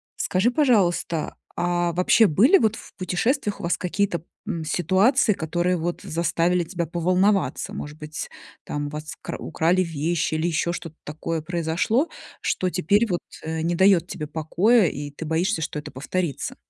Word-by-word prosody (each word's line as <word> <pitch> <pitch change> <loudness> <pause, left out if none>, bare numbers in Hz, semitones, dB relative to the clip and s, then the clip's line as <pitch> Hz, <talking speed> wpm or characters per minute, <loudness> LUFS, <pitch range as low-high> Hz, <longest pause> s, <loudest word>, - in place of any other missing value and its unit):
Скажи, 195 +7 +1
пожалуйста, 190 - +1 0.3
а 175 0 +1
вообще 185 +5 +5
были 245 - +5
вот 220 - +2
в - - -13
путешествиях 205 - -1
у - - -8
вас 170 - +1
какие-то, 180 -2 -1 0.2
м, 165 -2 -3
ситуации, 195 - +3
которые 175 +2 0
вот 175 +2 -3
заставили 170 +2 +1
тебя 170 0 -3
поволноваться? 185 +4 +1
Может 150 -5 -6
быть, 150 0 -6 0.3
там 145 0 -3
у - - -5
вас 150 +1 -6
кра - - -5
украли 175 +3 +1
вещи 165 0 -1
или 160 +2 0
еще 170 +1 0
что-то 165 -2 -7
такое 160 +2 -4
произошло, 175 - 0 0.3
что 185 - 0
теперь 195 +6 +2
вот, 175 - 0 0.2
э, 160 0 -3
не 170 +1 0
дает 190 -2 +4
тебе 155 - -5
покоя, 180 +8 +3
и 145 0 -5
ты 160 - -7
боишься, 165 +4 0
что 150 - -3
это - - -9
повторится? 150 +3 -3
175 Hz, 160 wpm, -24 LUFS, 160-190 Hz, 0.3 s, вообще